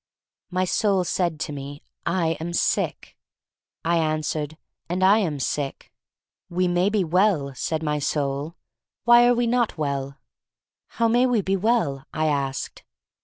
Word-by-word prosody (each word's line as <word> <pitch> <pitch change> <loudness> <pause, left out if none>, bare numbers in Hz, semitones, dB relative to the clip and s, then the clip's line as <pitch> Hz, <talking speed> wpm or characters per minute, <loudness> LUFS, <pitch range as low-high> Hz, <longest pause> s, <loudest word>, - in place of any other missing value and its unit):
My 185 0 0
soul 195 0 +2
said 175 -3 -1
to - - -3
me: 140 +1 -8 0.2
"I 170 -1 +1
am 170 +2 -4
sick." - - -1 0.7
I 170 +1 +2
answered: 155 -1 -2 0.3
"And 180 +2 -1
I 200 +3 +6
am 160 -9 -1
sick." 135 +1 -3 0.6
We 180 +1 +1
may 175 +2 +2
be 205 -2 +1
well," 170 -5 +2
said 160 +5 -2
my 150 -1 0
soul. 145 +2 -2 0.5
Why 240 +1 +7
are 245 - +4
we 240 0 +1
not 235 -4 +1
well?" 140 -2 -3 0.7
"How 230 - 0
may 240 +3 +3
we 240 -4 +2
be 195 0 0
well?" 190 - 0
I 155 - -1
asked. 140 -3 -2
170 Hz, 150 wpm, -24 LUFS, 145-200 Hz, 0.7 s, Why